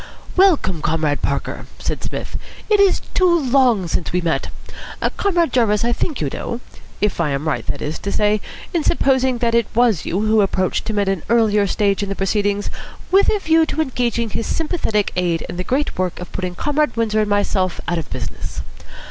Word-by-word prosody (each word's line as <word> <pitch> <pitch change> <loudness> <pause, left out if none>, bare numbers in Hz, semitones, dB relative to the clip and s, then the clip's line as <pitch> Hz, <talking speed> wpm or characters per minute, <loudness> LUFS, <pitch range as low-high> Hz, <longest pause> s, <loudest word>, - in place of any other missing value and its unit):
"Welcome, 310 - +3
Comrade 155 -2 0
Parker," - - -2
said - - -4
Psmith. - - -5 0.4
"It 420 - +5
is 395 -2 +4
too 355 -2 +4
long 250 - +3
since 165 0 -2
we 180 - +1
met. 170 -2 -1 0.7
Comrade 345 -8 +1
Jarvis 225 -3 +2
I 240 - +1
think 300 +3 -2
you 145 - -1
know. 235 - -4 0.4
If 210 -4 +1
I 155 - +1
am 140 +2 -2
right, 155 - -1
that - - -3
is 150 +2 -3
to 200 - -3
say, 210 0 +2 0.3
in 335 -3 +1
supposing 260 -5 +2
that 235 -1 0
it 235 -2 +3
was 230 -7 +3
you 190 - -1
who 215 0 +3
approached 195 +2 0
him 215 - -2
at 200 -1 +1
an 195 -3 0
earlier 215 -3 +3
stage 200 0 +1
in 200 - -3
the 195 - -2
proceedings 205 +1 0 0.4
with 390 +2 +5
a 425 - +3
view 325 -4 +3
to - - -3
engaging 240 -6 0
his 225 - -3
sympathetic 305 - 0
aid 175 -2 0
in - - -6
the 180 - -2
great 265 0 -1
work 185 -2 -1
of 180 - -8
putting 180 -1 -4
Comrade 295 +1 0
Windsor 220 -2 +1
and 210 - -1
myself 200 -2 +1
out 175 0 0
of 160 - -7
business. - - -5
215 Hz, 200 wpm, -20 LUFS, 185-260 Hz, 0.7 s, It